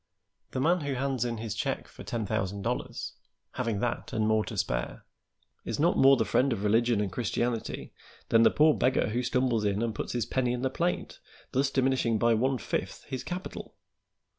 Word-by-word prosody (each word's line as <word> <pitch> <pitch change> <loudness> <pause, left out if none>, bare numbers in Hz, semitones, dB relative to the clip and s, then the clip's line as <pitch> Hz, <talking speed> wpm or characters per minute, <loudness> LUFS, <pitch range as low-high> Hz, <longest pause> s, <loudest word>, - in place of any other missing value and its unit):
The - - -3
man 170 +6 +3
who 140 -2 -2
hands 130 -2 -1
in 120 -1 -2
his 110 -1 -4
check - - -2
for - - -12
ten 115 -2 -3
thousand 100 -1 -2
dollars, - - -3 0.4
having 115 -5 -2
that 120 -1 -2
and 110 0 0
more 110 0 +3
to 110 - -6
spare, 60 -11 -2 0.6
is - - -4
not - - +3
more 135 0 +6
the 110 - +1
friend 135 +1 +2
of 105 -4 -2
religion 115 +2 +3
and 100 -3 -1
Christianity 120 +1 -2 0.4
than 115 - +5
the 115 - +7
poor 155 +1 +5
beggar 130 -5 +2
who 120 +3 0
stumbles 125 -3 +1
in 105 +1 +1
and 115 -1 -1
puts - - -4
his 120 -3 0
penny 125 0 0
in 125 +1 -3
the 130 - +1
plate, 175 +5 -2 0.3
thus 135 +1 +2
diminishing 130 -4 +2
by 115 +1 +3
one 130 +4 +1
fifth - - -3
his 130 - -4
capital. 180 +2 -6
120 Hz, 195 wpm, -29 LUFS, 110-130 Hz, 0.6 s, the